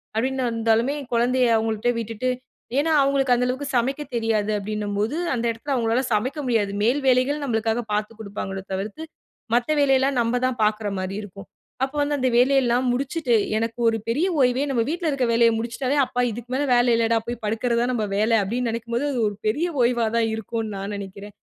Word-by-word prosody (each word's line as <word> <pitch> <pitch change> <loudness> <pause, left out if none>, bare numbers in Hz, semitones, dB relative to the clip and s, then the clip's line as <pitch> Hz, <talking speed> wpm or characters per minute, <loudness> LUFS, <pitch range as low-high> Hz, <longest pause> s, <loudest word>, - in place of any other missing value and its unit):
அப்பிடின்னு 260 +2 0
வந்தாலுமே 230 +4 +1 0.2
குழந்தைய 250 +2 +2
அவுங்கள்ட்ட 220 +2 0
விட்டுட்டு 230 +3 -3 0.5
ஏன்னா 320 +2 +1
அவுங்களுக்கு 275 -2 +2
அந்த 250 +1 +1
அளவுக்கு 265 +3 -3
சமைக்க 270 +5 0
தெரியாது. 220 -2 0
அப்பிடின்னம்போது 210 +5 -2 0.2
அந்த 235 0 -2
இடத்தில 255 +5 -4
அவுங்களால 235 +2 +1
சமைக்க 255 +8 -1
முடியாது. 220 -5 +1
மேல் 260 +6 +2
வேலைகள் 260 +4 +3
நம்மளுக்காக 225 -1 0
பார்த்துக் 215 +1 -2
கொடுப்பாங்களோ 195 -2 -5
தவிர்த்து 205 +11 -4 0.5
மத்த 245 +5 +1
வேலையெல்லாம் 270 -1 +3
நம்ம 235 +2 0
தான் 250 -2 -1
பார்க்குற 210 0 +1
மாரி 185 +1 -4
இருக்கும். 195 0 -11 0.4
அப்போ 270 +2 -2
வந்து 290 0 0
அந்த 255 0 +2
வேலையெல்லாம் 255 -1 +3
முடிச்சுட்டு 270 -1 0 0.2
எனக்கு 230 +1 -3
ஒரு 225 - 0
பெரிய 305 +11 +1
ஓய்வே 250 +2 +3
நம்ம 235 -3 +1
வீட்ல 335 -1 -1
இருக்குற 265 -4 0
வேலைய 230 0 +5
முடிச்சுட்டாலே, 240 +5 -2
"அப்பா! 250 0 -2
இதுக்கு 240 +2 -8
மேல 290 +2 0
வேலை 240 0 +4
இல்லடா! 230 0 +2
போய் 240 -1 -4
படுக்கிற 225 +3 0
தான் 250 +1 +1
நம்ம 220 -3 0
வேல" 220 +2 +2
அப்பிடீன்னு 235 +4 -1
நெனைக்கும் 235 0 -4
போது, 275 +5 0
அது 250 - -2
ஒரு 205 - -8
பெரிய 300 +11 +1
ஓய்வா 235 -1 +2
தான் 225 -1 +2
இருக்குன்னு 220 0 -4
நான் 200 +1 -5
நெனைக்கிறேன். 200 +1 -8
235 Hz, 180 wpm, -23 LUFS, 220-260 Hz, 0.5 s, வேலைய